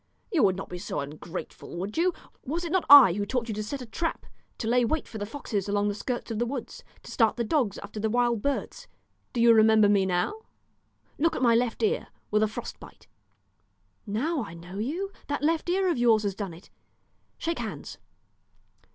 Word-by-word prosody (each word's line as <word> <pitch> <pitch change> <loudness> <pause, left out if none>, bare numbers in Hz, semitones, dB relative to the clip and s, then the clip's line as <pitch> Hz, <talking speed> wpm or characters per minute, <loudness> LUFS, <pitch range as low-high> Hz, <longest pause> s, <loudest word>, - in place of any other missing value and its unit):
You 340 -8 +2
would 190 -3 +4
not 195 - -6
be 180 - -7
so 185 - -4
ungrateful, 155 +5 -7
would 195 +4 -4
you? 355 +3 +3 0.3
Was 330 +6 -3
it 335 - -4
not 375 0 +1
I 275 -11 +10
who 205 +2 -2
taught 240 +2 -2
you 220 - -3
to 210 - -3
set 255 +5 -5
a - - -8
trap, 330 +8 -3 0.3
to 225 - -4
lay 245 +1 +3
wait 295 +6 -1
for 220 - -8
the 205 - -4
foxes 210 -6 -4
along 205 0 +1
the - - -1
skirts 240 +3 -4
of 220 - -2
the 240 - +1
woods, 245 -2 -6 0.2
to - - -10
start 225 -3 +3
the 235 - -1
dogs 235 -3 0
after 205 +1 -7
the 220 +1 0
wild 240 -1 +1
birds? 285 - -3 0.4
Do 245 - -3
you 235 0 +7
remember 220 -1 +6
me 200 -2 +3
now? 180 - 0 0.9
Look 330 +3 +2
at - - -2
my 235 -2 +5
left 235 - 0
ear, 445 +3 +1 0.2
with 210 0 +3
a 215 - +3
frost 215 - -7
bite." - - -14 1.0
"Now 270 +8 -1
I 170 -5 -9
know 180 +4 -9
you; 340 - -3 0.2
that 290 0 -2
left 325 +2 +1
ear 375 +1 +2
of 340 -8 +1
yours 225 -3 +4
has 200 -1 -1
done 195 -4 -5
it; 175 - -17 0.7
Shake 335 +1 -2
hands." - - -6
230 Hz, 210 wpm, -27 LUFS, 205-285 Hz, 1.0 s, I